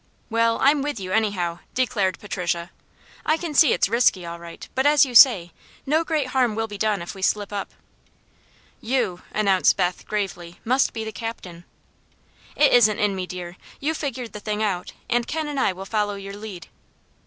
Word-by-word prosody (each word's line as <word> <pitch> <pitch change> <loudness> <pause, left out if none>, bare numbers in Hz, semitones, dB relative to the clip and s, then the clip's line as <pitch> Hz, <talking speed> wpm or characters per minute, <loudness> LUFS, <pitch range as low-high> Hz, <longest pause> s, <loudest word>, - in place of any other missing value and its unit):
"Well, 230 0 +2
I'm 285 +1 +4
with 290 -5 -3
you, 185 -1 -6
anyhow," 185 -6 0 0.2
declared 210 -7 0
Patricia. 175 -3 -3 0.5
"I 310 - +2
can 330 -2 -5
see 295 -2 +6
it's - - +2
risky, 210 -5 +2
all 170 0 -7
right; 170 0 -10
but 265 +2 +2
as 295 -1 +6
you 255 - -7
say, 200 -9 +7 0.3
no 310 +4 +2
great 305 -5 -1
harm 250 -4 +1
will 225 0 -1
be 205 -2 -9
done 210 -4 0
if 170 - -7
we 195 - -11
slip 205 +1 0
up." 200 - -4 1.1
"You," 225 -7 -1
announced 195 -3 +3
Beth, 180 0 -1
gravely, 175 -5 -4
"must 255 +4 +2
be 225 - -4
the 220 - -5
captain." 185 -5 -7 0.9
"It 295 - +4
isn't 220 -4 +5
in 205 -2 +1
me, 185 -1 -4
dear. 180 0 -7 0.2
You 305 +3 -1
figured 260 -6 -5
the 210 - -6
thing 210 +1 -2
out, 185 -4 -2
and 240 0 0
Ken 315 -1 -2
and 290 -2 -3
I 230 - +2
will 190 +1 -8
follow 205 0 -1
your 195 0 -8
lead." 205 -5 -8
210 Hz, 190 wpm, -23 LUFS, 185-255 Hz, 1.1 s, say